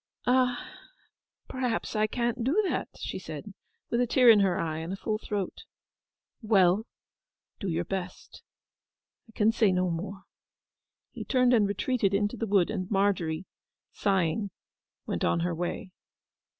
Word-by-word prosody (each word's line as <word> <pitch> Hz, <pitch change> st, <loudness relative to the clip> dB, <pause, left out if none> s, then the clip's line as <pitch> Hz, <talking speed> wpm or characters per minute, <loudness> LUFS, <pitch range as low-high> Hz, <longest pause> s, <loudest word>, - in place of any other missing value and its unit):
'Ah, 250 Hz, 0 st, +2 dB, 0.8 s
perhaps 250 Hz, -3 st, -2 dB
I 215 Hz, 0 st, +2 dB
can't 240 Hz, +1 st, -1 dB
do 285 Hz, -, +2 dB
that,' -, -, -2 dB
she -, -, -5 dB
said, -, -, -8 dB, 0.4 s
with 235 Hz, -, +2 dB
a 245 Hz, -, +2 dB
tear 245 Hz, 0 st, +7 dB
in 215 Hz, -, +6 dB
her 190 Hz, -3 st, +2 dB
eye, 160 Hz, -1 st, -2 dB
and 165 Hz, +2 st, -5 dB
a -, -, -2 dB
full 215 Hz, +2 st, -2 dB
throat. 205 Hz, -4 st, -4 dB, 0.8 s
'Well—do 200 Hz, 0 st, -1 dB
your 170 Hz, +1 st, -1 dB
best. 185 Hz, -1 st, -6 dB, 0.9 s
I -, -, -15 dB
can 215 Hz, +1 st, +3 dB
say 220 Hz, -3 st, +3 dB
no 180 Hz, -1 st, +1 dB
more.' 195 Hz, +4 st, -5 dB, 0.9 s
He -, -, -7 dB
turned 250 Hz, -1 st, +3 dB
and 215 Hz, -4 st, +4 dB
retreated 200 Hz, 0 st, 0 dB
into 205 Hz, +3 st, 0 dB
the 225 Hz, -1 st, -3 dB
wood, 195 Hz, -2 st, +3 dB
and 185 Hz, -4 st, -3 dB
Margery, 190 Hz, -5 st, 0 dB, 0.5 s
sighing, 195 Hz, 0 st, 0 dB, 0.6 s
went -, -, -3 dB
on 170 Hz, -, +2 dB
her 175 Hz, 0 st, 0 dB
way. 175 Hz, +2 st, -4 dB
205 Hz, 145 wpm, -28 LUFS, 185-230 Hz, 0.9 s, tear